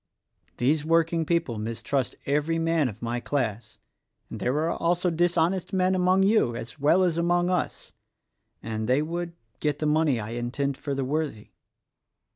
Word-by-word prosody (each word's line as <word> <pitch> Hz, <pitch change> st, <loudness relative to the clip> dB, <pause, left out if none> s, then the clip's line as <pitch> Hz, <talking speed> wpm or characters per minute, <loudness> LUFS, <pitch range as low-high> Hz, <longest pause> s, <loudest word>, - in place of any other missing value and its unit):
These 145 Hz, +5 st, +2 dB
working 165 Hz, 0 st, +2 dB
people 165 Hz, -10 st, 0 dB
mistrust 115 Hz, +4 st, -2 dB
every 150 Hz, +4 st, +1 dB
man 165 Hz, -4 st, +1 dB
of 110 Hz, +1 st, -11 dB
my 120 Hz, +1 st, -1 dB
class; 115 Hz, -5 st, -3 dB, 0.5 s
and -, -, -6 dB
there 125 Hz, -, 0 dB
are -, -, 0 dB
also 175 Hz, +1 st, +1 dB
dishonest 175 Hz, +2 st, +1 dB
men 185 Hz, 0 st, +2 dB
among 185 Hz, +1 st, +3 dB
you, 195 Hz, -, +3 dB
as 115 Hz, +6 st, -8 dB
well 160 Hz, +6 st, +4 dB
as 170 Hz, -2 st, +1 dB
among 175 Hz, +1 st, +2 dB
us, 180 Hz, -, -2 dB, 0.7 s
and 110 Hz, 0 st, -3 dB
they 135 Hz, +4 st, +3 dB
would 170 Hz, +2 st, -4 dB, 0.3 s
get 150 Hz, -2 st, 0 dB
the 155 Hz, -, -2 dB
money 150 Hz, -4 st, +2 dB
I 105 Hz, +1 st, -5 dB
intend 125 Hz, +4 st, -2 dB
for 140 Hz, +1 st, -4 dB
the 135 Hz, -1 st, -1 dB
worthy. 145 Hz, -6 st, -3 dB
155 Hz, 160 wpm, -26 LUFS, 125-170 Hz, 0.7 s, well